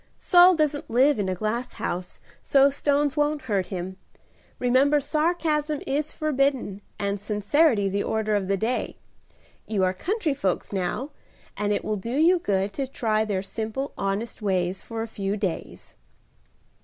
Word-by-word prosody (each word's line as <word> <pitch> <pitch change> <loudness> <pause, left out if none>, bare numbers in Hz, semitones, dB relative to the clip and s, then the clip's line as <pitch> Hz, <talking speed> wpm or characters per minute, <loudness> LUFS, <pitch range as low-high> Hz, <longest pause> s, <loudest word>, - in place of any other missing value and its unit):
"Saul 360 +1 +6
doesn't 300 -2 0
live 260 +3 +4
in 195 -2 0
a 185 - -1
glass 215 +6 -3
house, 180 +1 -4 0.2
so 275 0 +4
stones 285 0 +1
won't 295 -1 0
hurt 200 -7 -1
him. 185 0 -5 0.6
Remember 265 +4 +3
sarcasm 305 0 0
is 290 +2 -1
forbidden 275 -9 0 0.2
and 200 0 -2
sincerity 210 +3 +2
the 200 +1 -1
order 215 0 -1
of 200 -2 0
the 195 0 +1
day. 230 +6 -2 0.7
You 205 -4 0
are 185 0 +2
country 345 - -1
folks 195 -7 -2
now, 195 +10 -2 0.4
and 210 0 -1
it 205 - -1
will 215 - -1
do 230 +7 -3
you 345 +4 +5
good 200 - -1
to 275 -2 -3
try 220 -4 0
their 200 -3 -2
simple, 225 +7 -4
honest 200 +4 -3
ways 185 -2 0
for 225 -1 -5
a - - -5
few 200 -1 -3
days." 190 -5 -5
225 Hz, 155 wpm, -25 LUFS, 200-290 Hz, 0.7 s, Saul